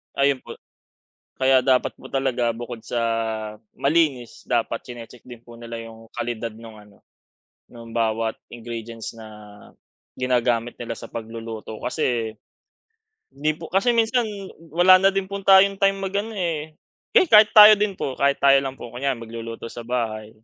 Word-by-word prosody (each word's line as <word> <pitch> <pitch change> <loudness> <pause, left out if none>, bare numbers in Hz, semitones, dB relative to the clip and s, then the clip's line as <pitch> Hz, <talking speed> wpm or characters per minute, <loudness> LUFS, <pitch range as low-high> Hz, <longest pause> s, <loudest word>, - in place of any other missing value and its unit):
Ayun 140 -1 +2
po. - - -11 0.8
Kaya 130 0 +4
dapat 130 0 +2
po 130 - -11
talaga 130 -3 0
bukod 120 0 -7
sa 120 +1 -3 0.8
malinis 140 -5 0
dapat 115 0 -1
chine-check 120 -1 -11
din 120 -2 -12
po 120 - -14
nila 115 0 -7
yung 115 0 -11
kalidad 120 -1 -3
nung 115 -1 -12
ano, 105 -1 -21 0.7
nung 115 -1 -12
bawat 115 -1 0 0.2
ingredients 115 -1 -7
na 110 - -10 0.9
ginagamit 120 -2 0
nila 115 -1 -4
sa - - -10
pagluluto 115 -1 -7
kasi 120 -6 -2 1.0
hindi 150 +3 0
po 165 - -8
kasi 195 +6 +3
minsan 230 +1 +2 0.5
wala 175 +4 +6
na 195 - +5
din 195 -1 -2
po 200 +1 -6
tayong 195 +1 +6
time 195 0 +3
mag-ano 200 +3 -2
eh, 160 -4 -3 0.4
eh, - - +7
kahit 215 -6 +7
tayo 210 0 +10
din 210 0 -1
po, 135 - -3
kahit 140 +1 +1
tayo 140 0 +5
lang 135 -1 -6
po, - - -8
kunyari 130 0 -2
magluluto 115 0 -8
sa 120 +1 -8
bahay. 115 -3 -3
125 Hz, 155 wpm, -23 LUFS, 115-160 Hz, 1.0 s, tayo